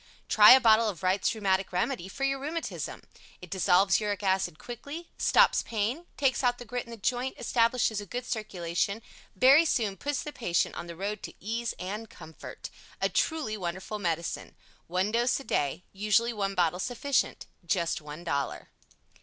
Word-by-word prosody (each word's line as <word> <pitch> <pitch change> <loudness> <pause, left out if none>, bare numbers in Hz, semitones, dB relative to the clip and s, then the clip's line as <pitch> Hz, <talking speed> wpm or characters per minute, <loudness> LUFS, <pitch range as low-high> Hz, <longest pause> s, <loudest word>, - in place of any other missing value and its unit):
Try 210 +1 +9
a 260 - +8
bottle 225 -2 +5
of 190 -3 -7
WRIGHT'S 185 +1 +2
RHEUMATIC 195 -3 0
REMEDY 185 +2 -1
for 230 +8 -6
your 275 0 +1
rheumatism. 315 +4 -5 0.4
It 180 -2 -12
dissolves 190 +1 +4
Uric 205 -2 -2
acid 190 -4 0
quickly, 285 - -8
stops - - +4
pain, 235 +10 -2
takes 270 -1 +1
out 245 -1 +2
the 245 - -9
grit 245 +2 -4
in - - -15
the 230 - -8
joint, 245 +5 -1
establishes 230 -2 +1
a 205 - -10
good 245 +6 -4
circulation, 200 -2 -2 0.3
very 270 - +7
soon 220 -11 0
puts 290 +7 -2
the 300 -2 -7
patient 175 -8 0
on 170 - -6
the 170 - -8
road 200 +4 -4
to - - -8
ease 230 +3 -3
and 210 +4 -5
comfort. 160 0 -10 0.3
A - - +1
truly 310 -10 0
wonderful 190 +2 -5
medicine. 170 -3 -3 0.3
One 185 +4 0
dose 240 +3 +2
a - - -9
day. 145 - -1
Usually 215 +4 +2
one 195 -2 -2
bottle 175 0 +1
sufficient. 255 +5 -1 0.2
Just 170 -2 0
one 150 +2 -9
Dollar. 140 -5 -3
210 Hz, 170 wpm, -28 LUFS, 185-245 Hz, 0.4 s, Try